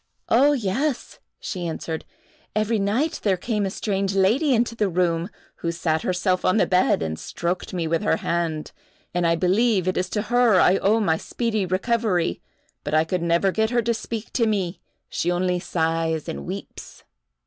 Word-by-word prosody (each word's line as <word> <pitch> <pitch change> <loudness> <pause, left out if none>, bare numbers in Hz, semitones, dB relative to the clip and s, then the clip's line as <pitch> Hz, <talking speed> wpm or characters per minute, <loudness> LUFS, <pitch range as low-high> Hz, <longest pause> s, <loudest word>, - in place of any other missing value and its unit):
"Oh, 280 +5 +5
yes," 255 +4 -2 0.2
she 180 -3 -4
answered; 160 0 -4 0.5
"every 215 +1 +1
night 240 +11 0
there 195 -3 +2
came 210 +1 -1
a - - -2
strange 195 -1 -2
lady 225 +11 +3
into 235 -1 +2
the 210 -3 +1
room, 170 0 0 0.3
who 170 - -2
sat 160 -2 -1
herself 185 0 0
on 185 - +3
the - - +4
bed 180 - +2
and 80 0 -3
stroked 175 +1 -3
me 175 -3 -2
with 165 +1 0
her 210 - +2
hand, 165 -3 -2 0.4
and 175 -1 +1
I 165 - +3
believe 190 +3 +2
it 185 - 0
is 180 - -1
to 210 - -1
her 240 -6 +5
I 185 +2 +5
owe 215 +3 +3
my 165 -7 +2
speedy 220 -3 -2
recovery; 185 - 0 0.4
but 145 +1 -1
I 155 - +5
could 175 +2 -2
never 170 +3 +2
get 220 +3 +1
her 240 -1 +1
to 235 +1 +1
speak 225 0 -6
to 230 -3 +2
me—she 185 -3 -3
only 180 0 0
sighs 165 -2 -1
and 70 0 -5
weeps." - - -8
185 Hz, 180 wpm, -23 LUFS, 170-220 Hz, 0.5 s, Oh